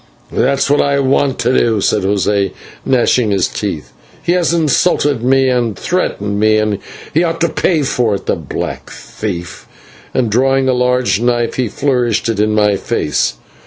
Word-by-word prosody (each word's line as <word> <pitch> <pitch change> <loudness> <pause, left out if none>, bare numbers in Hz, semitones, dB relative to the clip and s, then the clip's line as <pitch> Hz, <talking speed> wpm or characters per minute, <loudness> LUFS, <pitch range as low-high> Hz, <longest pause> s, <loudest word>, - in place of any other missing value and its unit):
"That's 135 0 +1
what 145 +1 +3
I 140 0 +1
want 135 0 +1
to 125 +2 +1
do," 115 -3 +2
said - - +1
José, 100 0 0 0.3
gnashing 125 -2 +2
his 100 -3 +1
teeth, - - -5 0.3
"he - - 0
has 175 -2 +2
insulted 150 -4 +1
me 135 +2 +3
and 120 -4 0
threatened 105 - -2
me, 110 0 +3
and 105 -2 0 0.4
ought 165 -1 -1
to 170 - +2
pay 160 -1 +1
for 120 -5 0
it, - - -7
the - - 0
black 80 -6 -5
thief," 90 -5 -7 0.4
and, 120 -4 0
drawing 135 +3 +2
a 130 - +3
large 125 -3 +1
knife, 120 -1 0
he 125 -2 -1
flourished 120 -2 0
it 110 -3 -1
in 105 0 +1
my 105 -2 +3
face. 85 -11 -1
120 Hz, 165 wpm, -15 LUFS, 105-135 Hz, 0.4 s, what